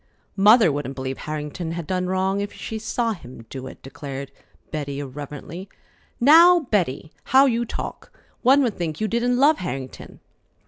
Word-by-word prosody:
"Mother 210 Hz, -2 st, +6 dB
wouldn't 140 Hz, -1 st, -4 dB
believe 130 Hz, 0 st, -5 dB
Harrington 155 Hz, +2 st, -5 dB
had 170 Hz, -1 st, -5 dB
done 180 Hz, +2 st, -1 dB
wrong 190 Hz, +2 st, 0 dB
if 205 Hz, -, -4 dB
she 220 Hz, -, -6 dB
saw 230 Hz, +1 st, -1 dB
him 125 Hz, -, -12 dB
do 130 Hz, -1 st, -6 dB
it," -, -, -12 dB
declared 140 Hz, 0 st, -7 dB, 0.4 s
Betty 140 Hz, -2 st, -4 dB
irreverently. 145 Hz, +6 st, -8 dB, 0.5 s
"Now, 335 Hz, +7 st, +7 dB
Betty! 175 Hz, -, -1 dB
How 265 Hz, +2 st, +6 dB
you 240 Hz, -2 st, +1 dB
talk! -, -, -6 dB, 0.3 s
One 270 Hz, +3 st, +5 dB
would 235 Hz, -4 st, 0 dB
think 160 Hz, -5 st, -4 dB
you 215 Hz, -, 0 dB
didn't 240 Hz, +3 st, 0 dB
love 290 Hz, +4 st, +4 dB
Harrington." 135 Hz, -8 st, -7 dB
180 Hz, 155 wpm, -23 LUFS, 145-230 Hz, 0.5 s, Now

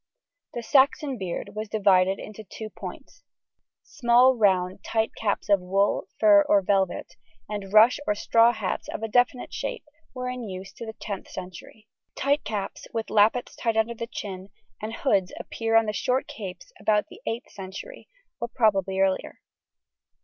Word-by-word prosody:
The 240 Hz, -, -4 dB
Saxon 270 Hz, 0 st, +3 dB
beard 190 Hz, +1 st, -4 dB
was 215 Hz, 0 st, -5 dB
divided 195 Hz, -3 st, +3 dB
into 215 Hz, +1 st, -9 dB
two 215 Hz, +2 st, -8 dB
points. -, -, -10 dB, 0.6 s
Small 250 Hz, -1 st, +4 dB
round 190 Hz, -4 st, +2 dB
tight 225 Hz, 0 st, 0 dB
caps 205 Hz, -2 st, -1 dB
of 200 Hz, -1 st, +4 dB
wool, 195 Hz, +3 st, +1 dB
fur, 205 Hz, -2 st, +7 dB
or 200 Hz, -1 st, +5 dB
velvet, 195 Hz, -1 st, 0 dB, 0.3 s
and 200 Hz, -2 st, -5 dB
rush 220 Hz, +4 st, +6 dB
or 210 Hz, -, +2 dB
straw 230 Hz, +3 st, +4 dB
hats 215 Hz, -5 st, -3 dB
of 220 Hz, -, -5 dB
a -, -, 0 dB
definite 245 Hz, +2 st, +1 dB
shape -, -, -4 dB, 0.3 s
were 250 Hz, 0 st, -4 dB
in 250 Hz, 0 st, -4 dB
use 190 Hz, +1 st, -8 dB
to 230 Hz, -, -8 dB
the 220 Hz, -, -7 dB
10th 200 Hz, -3 st, -6 dB
century. 185 Hz, +4 st, -10 dB, 0.3 s
Tight 285 Hz, +2 st, +1 dB
caps, 205 Hz, -3 st, -5 dB
with 225 Hz, -1 st, -4 dB
lappets 220 Hz, +4 st, +3 dB
tied 230 Hz, -2 st, -1 dB
under 220 Hz, +1 st, +2 dB
the 230 Hz, 0 st, -6 dB
chin, 190 Hz, -3 st, -7 dB, 0.3 s
and 215 Hz, +1 st, -4 dB
hoods 200 Hz, -10 st, +1 dB
appear 225 Hz, 0 st, -2 dB
on 225 Hz, 0 st, +6 dB
the 210 Hz, -, -2 dB
short 255 Hz, +4 st, 0 dB
capes 185 Hz, -5 st, -9 dB
about 210 Hz, +1 st, +2 dB
the 405 Hz, -, -14 dB
8th 235 Hz, +3 st, -4 dB
century, 200 Hz, -, -9 dB, 0.3 s
or 235 Hz, -, -2 dB
probably 195 Hz, -6 st, +1 dB
earlier. 190 Hz, -1 st, 0 dB
215 Hz, 165 wpm, -26 LUFS, 195-235 Hz, 0.6 s, fur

